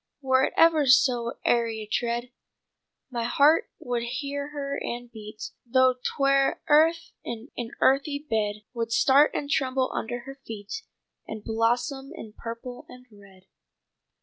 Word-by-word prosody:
Were 260 -2 +3
it - - -4
ever 320 -3 +5
so 250 -2 +4
airy 230 -2 +1
a - - -6
tread 235 +3 -2 0.8
My 235 -2 -2
heart 290 +6 +4
would 245 -8 -3
hear 280 +4 -4
her 280 -1 -4
and 240 0 -5
beat 215 -1 -9
Though 255 +1 +4
'twere 275 -1 +2
earth 325 +2 +4
in 235 +3 -7
an 235 -2 -4
earthy 275 +2 +3
bed. 215 -7 -2
Would 230 -1 -3
start 275 +5 +5
and 285 - -2
tremble 260 -2 0
under 240 +2 -3
her 270 +2 -11
feet 220 - -7 0.5
And 220 -1 -7
blossom 240 +5 0
in 215 -1 -10
purple 235 +2 -8
and 250 0 -13
red.'" 195 -2 -18
250 Hz, 145 wpm, -26 LUFS, 230-275 Hz, 0.8 s, ever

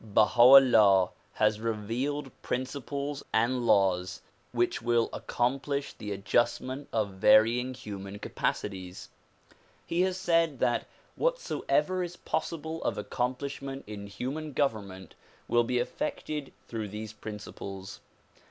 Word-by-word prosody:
Baha 110 +2 +3
'Ullah 115 -8 +8 0.2
has 105 0 +2
revealed 115 +6 -2
principles 140 +2 -3
and 120 +2 +1
laws 95 -3 +2 0.3
which 120 0 0
will 120 0 +2
accom 125 +3 -1
plish 140 0 -3
the 105 -2 -7
adjustment 120 +7 0
of 110 -3 0
varying 115 +6 +4
human 100 -5 -7
capacities. 95 -2 -4 0.8
He 170 +1 0
has 185 0 +1
said 165 -5 +2
that 120 - +1 0.3
whatsoever 390 - 0
is 175 0 -4
possible 160 0 -3
of - - -1
accomplishment 135 +5 -3
in 100 -1 -7
human 140 +8 -5
government 100 - -2 0.3
will 120 0 +3
be 125 +1 -1
effected 145 +3 -3 0.2
through 110 -2 -4
these 105 +1 -7
principles. 100 -3 -8
120 Hz, 115 wpm, -29 LUFS, 105-140 Hz, 0.8 s, Ullah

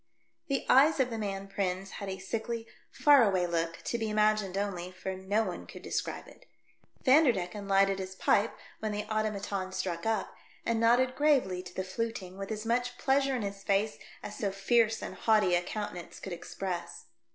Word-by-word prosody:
The 275 -2 -1
eyes 290 +4 +6
of 255 -2 +2
the 225 - -3
man 195 -2 -3
Prins 195 0 -2
had 200 - -4
a 190 - -4
sickly, 225 +4 -4 0.2
far 290 -2 +6
away 190 -5 +3
look, 170 -1 -2
to 235 - -2
be 220 -1 -1
imagined 210 -2 +2
only, 185 -3 -2
for 190 +1 -5
no 195 +4 0
one 185 -4 -5
could - - -11
describe - - -3
it. - - -17 0.6
Vanderdecken 215 - +3
lighted 195 0 +3
his 190 0 -5
pipe 205 +3 +2 0.2
when 215 -1 -2
the 210 0 -2
automaton 200 -3 -2
struck 185 -1 -3
up, 225 -1 -1 0.3
and 230 -1 +1
nodded 245 +3 +4
gravely 265 -12 +2
to 180 -1 -12
the 190 - -1
fluting 190 -1 -4
with 195 +2 -6
as 215 0 -4
much 245 +1 0
pleasure 270 0 +2
in 240 - -2
his 200 0 -5
face 200 +2 0 0.2
as 210 - -6
so 205 - -1
fierce 225 +3 +2
and - - -5
haughty 210 -5 +3
a 175 - +4
countenance 180 -2 -6
could 190 - -6
express. 175 0 -5
205 Hz, 185 wpm, -30 LUFS, 190-230 Hz, 0.6 s, eyes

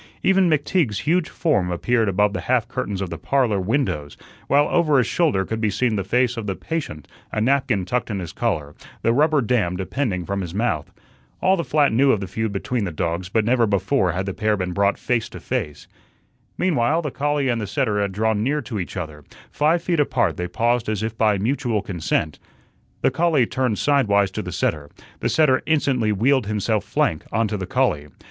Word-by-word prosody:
Even 190 -2 +4
McTeague's 150 - +1
huge 170 +2 +1
form 105 - 0
appeared 110 +5 +1
above 100 +2 +2
the - - -3
half 125 -3 +1
curtains 100 -4 -3
of 95 - -6
the - - -5
"Parlor" 125 -7 +1
windows, 90 - -1 0.3
while 145 +1 +4
over 155 -5 +3
his 125 - +3
shoulder 125 - +1
could 110 0 -4
be 110 - +2
seen 110 +3 0
the 100 - -1
face 120 +4 +1
of 110 -2 -4
the 95 - -2
"patient," 135 - -5 0.2
a - - -2
napkin 120 -5 +1
tucked 120 +6 -2
in 105 - -2
his 90 -4 -5
collar, 80 -11 -2 0.3
the 115 - +3
rubber 150 +2 +3
dam 105 -7 0
depending 95 -2 -2
from 100 0 -2
his 90 -1 -6
mouth. 105 -9 -1 0.5
All 190 +1 +3
the 170 - -2
flat 145 -6 +2
knew 135 +4 +4
of 110 - +1
the 100 - -4
feud 110 +4 -2
between 105 +4 -2
the 90 - -2
dogs, 85 +3 -3
but 110 +2 +1
never 120 0 +3
before 95 -3 +1
had 95 +2 -2
the 95 - -3
pair 105 0 0
been 90 -1 -2
brought 100 +2 +2
face 120 -3 -1
to - - -9
face. 105 - -4 0.7
Meanwhile, 160 -1 +1
the 150 - -3
collie 145 +1 0
and 120 -2 0
the 105 - -4
setter 105 0 0
had 100 -1 -1
drawn 110 +1 0
near 145 +5 0
to 110 -2 -4
each 90 - -5
other; 80 -4 -6 0.3
five 160 +3 +1
feet 170 -3 0
apart 120 - +1
they 90 - -3
paused 115 +5 0
as 110 -1 -2
if 110 0 -3
by 110 -2 +2
mutual 115 -1 -1
consent. 85 -5 -2 0.6
The - - +4
collie 155 -2 +2
turned 125 -3 -1
sidewise 100 -9 +2
to - - -4
the - - -6
setter; 75 -2 -2 0.3
the - - -1
setter 150 -5 +3
instantly 135 -8 +1
wheeled 125 +3 +2
himself 105 0 0
flank 80 - 0
on 115 +1 +1
to 105 - -2
the 95 -3 -4
collie. 125 - 0
110 Hz, 210 wpm, -22 LUFS, 95-135 Hz, 0.7 s, Even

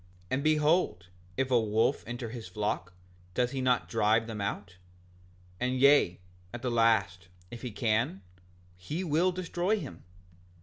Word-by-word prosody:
And 140 +2 0
behold, 155 - +2 0.3
if 135 0 0
a 125 - +5
wolf 110 +1 +1
enter 120 -1 -5
his 115 -5 -7
flock 90 -1 -3 0.4
doth 125 0 +1
he 135 - -3
not 125 -1 +2
drive 110 0 +2
him 110 -2 -5
out? 100 -2 -4 0.8
Yea, 130 0 +5
and - - -27 0.4
at 120 - -8
the 125 - 0
last, 100 -7 +2 0.2
if 120 - -8
he 125 - -4
can, 110 -2 0 0.5
he 145 - -4
will 170 +2 +2
destroy 180 +3 -1
him. 85 - -9
120 Hz, 145 wpm, -30 LUFS, 105-140 Hz, 0.8 s, a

